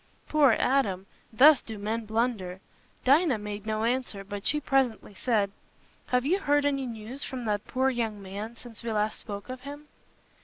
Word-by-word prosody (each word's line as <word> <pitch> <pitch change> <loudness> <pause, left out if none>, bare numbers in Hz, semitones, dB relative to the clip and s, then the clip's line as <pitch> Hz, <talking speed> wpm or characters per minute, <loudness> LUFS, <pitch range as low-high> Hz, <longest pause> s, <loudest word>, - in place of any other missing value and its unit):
Poor 290 -5 +5
Adam! 210 -8 +1 0.3
Thus 275 +5 +7
do 220 -2 -7
men 220 +2 -2
blunder. 220 -5 -1 0.5
Dinah 280 0 +5
made 210 0 -6
no 215 0 -1
answer, 235 -4 -1
but 200 0 -4
she 300 - +3
presently 265 -7 0
said, 205 -2 +1 0.6
"Have 250 0 +1
you 365 +7 +2
heard 290 -4 +2
any 275 -2 0
news 230 +4 -7
from 255 -3 -5
that 210 -1 -1
poor 265 +1 +1
young 225 -4 -2
man, 200 +4 -6
since 230 -3 -11
we 230 -1 -3
last 215 0 0
spoke 200 -2 -7
of 255 0 -7
him?" 290 +2 -9
230 Hz, 175 wpm, -28 LUFS, 210-265 Hz, 0.6 s, Thus